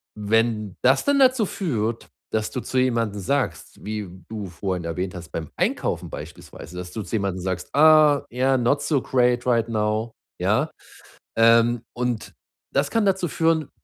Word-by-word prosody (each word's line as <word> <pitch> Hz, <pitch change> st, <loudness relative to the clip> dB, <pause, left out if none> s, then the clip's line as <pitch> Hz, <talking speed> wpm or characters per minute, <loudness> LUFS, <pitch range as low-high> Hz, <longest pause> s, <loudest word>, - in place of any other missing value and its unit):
wenn 110 Hz, -1 st, 0 dB
das 135 Hz, +2 st, +4 dB
dann 285 Hz, 0 st, +3 dB
dazu 255 Hz, -4 st, +4 dB
führt, 115 Hz, -, -2 dB, 0.2 s
dass 110 Hz, -1 st, -1 dB
du -, -, -3 dB
zu 130 Hz, -, -4 dB
jemandem 115 Hz, -5 st, 0 dB
sagst- 95 Hz, -9 st, -2 dB
wie 105 Hz, -2 st, -4 dB, 0.2 s
du 105 Hz, -3 st, -5 dB
vorhin 90 Hz, 0 st, -4 dB
erwähnt 90 Hz, +3 st, -3 dB
hast, 85 Hz, -1 st, -9 dB
beim 80 Hz, -2 st, -5 dB
Einkaufen -, -, -1 dB
beispielsweise- 80 Hz, +5 st, -10 dB
dass 90 Hz, 0 st, -6 dB
du 110 Hz, -, -4 dB
zu 105 Hz, -, -4 dB
jemandem 100 Hz, -3 st, -1 dB
sagst: 95 Hz, -1 st, -3 dB
„Ah 155 Hz, -1 st, +6 dB
ja, 130 Hz, +2 st, +2 dB
not 125 Hz, +4 st, +1 dB
so 145 Hz, -2 st, +1 dB
great 125 Hz, -1 st, +1 dB
right 115 Hz, -2 st, +2 dB
now.“ 110 Hz, +1 st, -1 dB, 0.3 s
ja? -, -, +1 dB, 0.7 s
Ähm, 115 Hz, +1 st, +5 dB
und 125 Hz, -2 st, -3 dB, 0.4 s
das 140 Hz, +1 st, +1 dB
kann 225 Hz, -2 st, +1 dB
dazu 190 Hz, -2 st, +1 dB
führen, 160 Hz, -1 st, +1 dB
115 Hz, 160 wpm, -23 LUFS, 105-140 Hz, 0.7 s, Ah